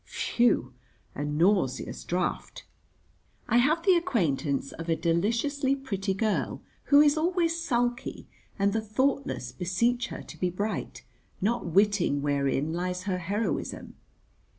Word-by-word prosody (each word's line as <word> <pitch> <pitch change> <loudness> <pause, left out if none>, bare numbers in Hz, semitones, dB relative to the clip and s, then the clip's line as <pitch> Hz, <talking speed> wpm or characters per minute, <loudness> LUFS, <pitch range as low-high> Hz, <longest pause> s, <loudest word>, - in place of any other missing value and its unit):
Phew, 235 - +1 0.4
a 145 - -4
nauseous 150 -1 +1
draught. 180 +1 -3 0.8
I - - +3
have 305 +7 +3
the 375 - +5
acquaintance 155 - 0
of 165 +1 -7
a 165 - +3
deliciously 230 - +1
pretty 195 -8 -3
girl, 215 +1 -1 0.2
who 285 0 +7
is 295 +1 +4
always 335 0 +1
sulky, 245 -3 -1 0.3
and 200 0 +2
the 225 - 0
thoughtless 260 - -1
beseech 190 - 0
her - - -7
to - - -12
be 180 - +1
bright, 180 -9 -4 0.4
not 230 +1 0
witting 180 -5 +2
wherein 140 +1 0
lies 180 +1 -2
her 185 -2 -1
heroism. 200 +6 -3
200 Hz, 130 wpm, -28 LUFS, 170-245 Hz, 0.8 s, who